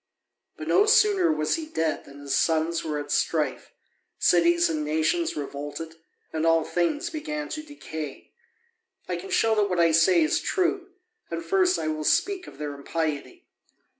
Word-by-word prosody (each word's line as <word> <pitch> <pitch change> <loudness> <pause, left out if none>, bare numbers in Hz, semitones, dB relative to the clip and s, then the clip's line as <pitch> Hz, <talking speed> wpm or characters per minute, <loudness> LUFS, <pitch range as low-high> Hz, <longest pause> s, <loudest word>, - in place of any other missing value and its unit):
But - - -7
no 410 +2 +4
sooner 415 -6 +4
was 310 - 0
he 320 -1 -6
dead 160 - -2
than 140 0 -13
his 140 -1 -2
sons 165 +1 +1
were 155 -2 -2
at 145 0 -5
strife, 150 -5 0 0.5
cities 170 0 +4
and 155 -2 -2
nations 160 - 0
revolted, 145 +3 -6 0.4
and 160 0 -1
all 165 -1 +4
things 290 - -1
began 300 -1 -4
to 315 -1 -4
decay. 160 - -8 0.8
I - - -2
can 390 - -8
show 225 -12 +3
that 210 -2 +2
what 180 -2 0
I 165 -1 +5
say 165 +1 +5
is 155 - +1
true, 370 0 -1 0.4
and 335 - -4
first 370 -1 +3
I - - -3
will 155 0 -2
speak 375 - +1
of - - -12
their 150 -1 -4
impiety. 160 - -4
170 Hz, 165 wpm, -26 LUFS, -, 0.8 s, I